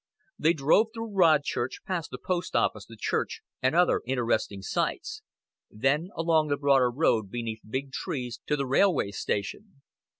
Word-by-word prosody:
They 165 Hz, -, +4 dB
drove 160 Hz, +8 st, +3 dB
through 225 Hz, -2 st, -5 dB
Rodchurch, 155 Hz, -8 st, +2 dB
past 180 Hz, -4 st, -3 dB
the -, -, -6 dB
post 180 Hz, 0 st, -3 dB
office, 105 Hz, -3 st, +1 dB
the 115 Hz, -, -12 dB
church, -, -, -2 dB, 0.2 s
and 130 Hz, +4 st, +2 dB
other 180 Hz, +1 st, +4 dB
interesting 115 Hz, -6 st, -1 dB
sights; 350 Hz, -, -2 dB, 0.5 s
then 140 Hz, -, 0 dB
along 165 Hz, -1 st, +2 dB
the 145 Hz, -1 st, 0 dB
broader 140 Hz, -3 st, +4 dB
road 120 Hz, -6 st, +1 dB
beneath 115 Hz, -1 st, -4 dB
big 135 Hz, +3 st, -3 dB
trees, 125 Hz, -3 st, -4 dB
to 150 Hz, -, +2 dB
the 140 Hz, -1 st, -1 dB
railway 135 Hz, -, +2 dB
station. 135 Hz, -, -4 dB
140 Hz, 155 wpm, -27 LUFS, 120-170 Hz, 0.5 s, They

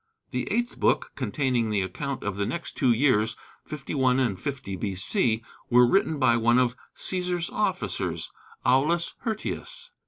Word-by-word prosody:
The -, -, -2 dB
eighth 240 Hz, +1 st, -1 dB
book, -, -, +2 dB
containing 125 Hz, -6 st, 0 dB
the 105 Hz, -3 st, +1 dB
account 135 Hz, +9 st, -4 dB
of 100 Hz, -2 st, -2 dB
the 100 Hz, 0 st, -1 dB
next 170 Hz, -1 st, -4 dB
two 130 Hz, -4 st, +3 dB
years, 115 Hz, -3 st, +3 dB, 0.3 s
51 135 Hz, -3 st, 0 dB
and 115 Hz, -8 st, 0 dB
50 130 Hz, -9 st, -4 dB
B.C., 110 Hz, -, 0 dB, 0.3 s
was 125 Hz, 0 st, +6 dB
written 160 Hz, -5 st, +3 dB
by 120 Hz, -4 st, +4 dB
one 120 Hz, +1 st, +4 dB
of 125 Hz, -1 st, +2 dB, 0.2 s
Cæsar's 180 Hz, -2 st, -1 dB
officers, 95 Hz, -, -1 dB, 0.3 s
Aulus 150 Hz, +7 st, +3 dB
Hirtius. 250 Hz, -, -4 dB
130 Hz, 145 wpm, -26 LUFS, 110-160 Hz, 0.3 s, was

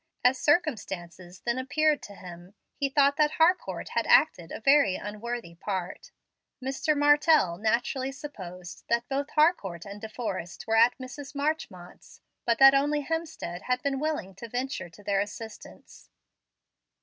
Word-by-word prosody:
As 250 Hz, +1 st, +4 dB
circumstances 190 Hz, -, -1 dB
then 240 Hz, +1 st, -1 dB
appeared 305 Hz, +3 st, +1 dB
to 200 Hz, -, -10 dB
him, 180 Hz, +1 st, -12 dB, 0.2 s
he 280 Hz, -1 st, -1 dB
thought 280 Hz, 0 st, +3 dB
that 300 Hz, -1 st, +3 dB
Harcourt 350 Hz, +3 st, +1 dB
had -, -, -1 dB
acted 310 Hz, -, +4 dB
a -, -, -5 dB
very 275 Hz, -5 st, +4 dB
unworthy 215 Hz, -2 st, -5 dB
part. 185 Hz, +1 st, -5 dB, 0.5 s
Mr. 270 Hz, +3 st, -1 dB
Martell 290 Hz, -, +4 dB
naturally 245 Hz, +4 st, 0 dB
supposed 180 Hz, -, -9 dB
that 235 Hz, +1 st, +1 dB
both 280 Hz, +1 st, -2 dB
Harcourt 255 Hz, -, +1 dB
and 200 Hz, 0 st, -9 dB
De 220 Hz, -, -6 dB
Forrest 195 Hz, -6 st, -5 dB
were 225 Hz, -, +1 dB
at 230 Hz, +2 st, +5 dB
Mrs. 270 Hz, +2 st, -9 dB
Marchmont's, 280 Hz, -, -4 dB, 0.3 s
but 235 Hz, -1 st, +3 dB
that 270 Hz, 0 st, +9 dB
only 290 Hz, +2 st, +2 dB
Hemstead 320 Hz, -, -4 dB
had 250 Hz, 0 st, 0 dB
been 275 Hz, -1 st, -1 dB
willing 300 Hz, -11 st, -2 dB
to 225 Hz, +5 st, -10 dB
venture 250 Hz, -5 st, -3 dB
to 205 Hz, +5 st, -17 dB
their 200 Hz, -1 st, +1 dB
assistance. 210 Hz, +2 st, -8 dB
245 Hz, 150 wpm, -27 LUFS, 195-290 Hz, 0.5 s, that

